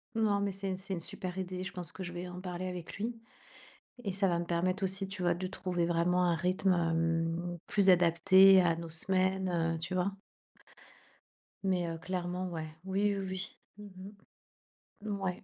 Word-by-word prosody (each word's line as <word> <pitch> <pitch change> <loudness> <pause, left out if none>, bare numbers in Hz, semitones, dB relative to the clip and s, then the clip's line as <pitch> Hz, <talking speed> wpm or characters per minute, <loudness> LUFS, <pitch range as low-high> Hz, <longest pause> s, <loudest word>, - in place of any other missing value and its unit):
Non, 210 -3 +2
mais 200 -1 0
c'est 195 0 -3
c'est 190 +1 -6
une 170 - -2
super 180 +2 -6
idée. 185 0 -4
Je 190 - -5
pense 180 -3 -4
que 190 - -6
je 175 - -6
vais 175 +1 -5
en 180 +1 -8
parler 180 0 -4
avec 180 0 -6
lui 230 +3 -3 0.9
et 200 - -2
ça 195 +1 +1
va 170 -1 +1
me 170 - -3
permettre 180 +4 0
aussi, 190 +1 -1
tu 190 -1 -6
vois, 175 -1 +2
de 185 +1 -4
trouver 180 -2 -2
vraiment 175 +1 +2
un 175 -1 +3
rythme, 185 +2 +1
hem, 165 +1 0
plus 195 -2 +3
adapté 185 +2 +7
à 170 -2 +2
nos 165 0 -7
semaines, 185 +3 +3 0.3
heu, - - -4
tu 175 +3 -5
vois? 185 +2 +1 1.5
Mais, 180 -3 +1
heu, 165 0 -4
clairement, 180 0 -3
ouais, 160 -2 -6
oui, 200 +2 +1
oui, 195 - -3
oui. 185 0 -4 0.4
Mmh 190 +2 -9 1.0
mh. - - -2
Mouais. 195 -3 -3
185 Hz, 185 wpm, -32 LUFS, 175-190 Hz, 1.5 s, adapté